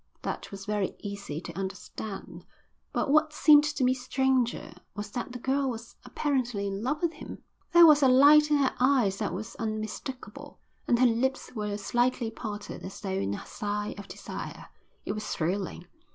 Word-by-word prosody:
That - - -4
was 195 -1 -8
very 210 -2 -1
easy 200 -7 -6
to 170 - -8
understand; 195 +2 -6 0.5
but - - 0
what 305 +1 +4
seemed 300 -1 +6
to 300 -3 -1
me 255 0 +4
stranger 255 -3 0 0.2
was 205 0 -6
that 245 +1 -4
the 250 - -5
girl 265 +2 0
was 230 -1 -7
apparently 245 -8 -1
in 195 0 -3
love 295 +7 -2
with 335 -1 +1
him. - - -10 0.3
There 345 -1 +9
was 300 -2 +7
a 270 - +6
light 290 +4 +7
in 300 - +4
her 275 -2 +2
eyes 250 -7 +3
that 210 -1 -2
was 210 +6 -6
unmistakable, 225 +4 -5 0.3
and 240 - +4
her 255 - +5
lips 255 +3 0
were 210 -3 -3
slightly 240 +2 0
parted 210 -2 -6
as 190 - -8
though 200 - -5
in 100 - -1
a - - -8
sigh 210 -1 -3
of 200 - -9
desire. - - -8 0.4
It - - -2
was 215 0 -4
thrilling. 180 +2 -2
235 Hz, 180 wpm, -28 LUFS, 205-265 Hz, 0.5 s, There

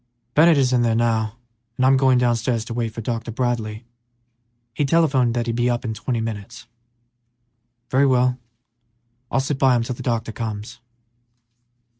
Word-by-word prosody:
"Bennett 160 +1 +5
is 130 -2 +2
in 125 - +3
there 115 -1 +2
now, 115 -1 0 0.4
and 130 - +2
I'm 135 +1 +5
going 130 -1 +4
downstairs 120 -1 0
to 115 - -6
wait 115 -1 -1
for 115 - -7
Dr. 115 0 -4
Bradley; 115 -2 -2 0.9
he 145 - -1
telephoned 135 -5 +2
that 120 -1 0
he'd 115 -1 -2
be 120 +1 +1
up 120 0 -1
in 110 - -2
twenty 115 +3 -3
minutes." 110 0 -6 1.3
"Very 135 +2 +4
well; 125 -1 +2 0.9
I'll - - +1
sit 135 +1 -2
by 130 -2 +4
him 120 - +1
till 125 - -4
the - - -9
doctor 115 -2 -2
comes." 110 -1 -6
120 Hz, 165 wpm, -22 LUFS, 115-130 Hz, 1.3 s, Bennett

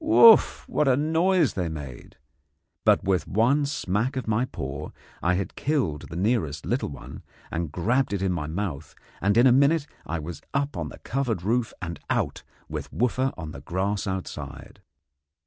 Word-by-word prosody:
Wouff! 230 -8 +7
what 150 - +1
a 130 -1 +4
noise 160 +2 +2
they 90 -3 -1
made! 70 -6 -8 0.7
But - - +5
with 95 -3 +1
one 130 +8 +3
smack 115 -1 -1
of 130 - -3
my 110 +3 +2
paw 70 - -5 0.3
I 90 +1 +2
had 95 +1 -3
killed 130 - -1
the - - -7
nearest 90 - 0
little - - -1
one, 70 - -9 0.3
and 85 -3 -2
grabbed 120 - +1
it 100 -2 -1
in 95 - +1
my 80 -4 -2
mouth, 80 -3 -4 0.3
and 100 +3 +2
in 120 - +7
a 130 - +7
minute 140 +4 +4 0.2
I 85 - -2
was 80 +2 -6
up 140 -2 0
on 80 -4 -3
the - - -11
covered 120 -8 -2
roof 115 +3 +1
and 85 -1 -5
out - - 0 0.3
with - - -5
Wooffa 130 +2 +1
on 80 -3 -6
the - - -9
grass 100 +3 -1
outside. 75 -7 -6
100 Hz, 175 wpm, -26 LUFS, 85-130 Hz, 0.7 s, Wouff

